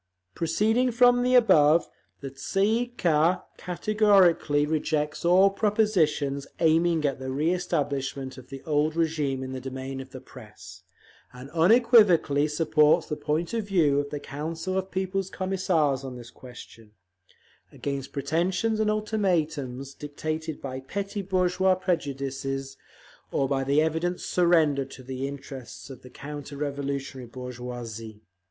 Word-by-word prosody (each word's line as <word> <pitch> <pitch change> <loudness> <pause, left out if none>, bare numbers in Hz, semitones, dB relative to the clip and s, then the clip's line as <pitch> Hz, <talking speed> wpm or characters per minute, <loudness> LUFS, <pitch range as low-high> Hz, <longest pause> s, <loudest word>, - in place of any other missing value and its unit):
Proceeding 215 +10 +1
from 245 +1 +5
the 250 +1 +2
above, 160 -9 +5 0.3
the 135 - -6
Tsay 195 +9 -1
ee 230 +3 +1
kah 165 +1 +2 0.2
categorically 180 -6 +3
rejects 150 -1 -1
all 185 +3 +5
propositions 180 -10 +1
aiming 165 0 +3
at 140 -2 -1
the 130 - -6
reëstablishment 140 -3 -2
of 130 - -15
the 135 -1 -9
old 155 0 0
régime 150 -5 -1
in 130 - -6
the 130 -1 -5
domain 130 +1 -6
of 135 - -11
the 130 -1 -9
Press, 105 -8 -13 0.5
and 125 +3 -11
unequivocally 180 - +4
supports 155 0 +3
the 150 - -1
point 150 +4 -2
of 225 -3 -2
view 155 -8 +3
of 145 0 -3
the 145 - -4
Council 165 +7 -5
of 190 0 -2
People's 190 0 -2
Commissars 180 -9 0
on 130 -2 -6
this 120 -1 -11
question, 115 -4 -13 0.8
against 140 -1 -5
pretentions 180 +9 0
and 215 -1 +2
ultimatums 160 - -1
dictated 155 +2 -5
by 130 -1 -5
petty 200 +9 -4
bourgeois 185 0 +2
prejudices, 135 -6 -3 0.6
or 135 - +1
by 135 0 0
evident 160 +5 +1
surrender 160 -6 +2
to 130 0 -12
the 130 +1 -4
interests 135 -1 -9
of 130 -1 -11
the 125 - -13
counter 145 +1 -8
revolutionary 140 -3 -4
bourgeoisie. 120 -3 -8
150 Hz, 135 wpm, -26 LUFS, 135-180 Hz, 0.8 s, from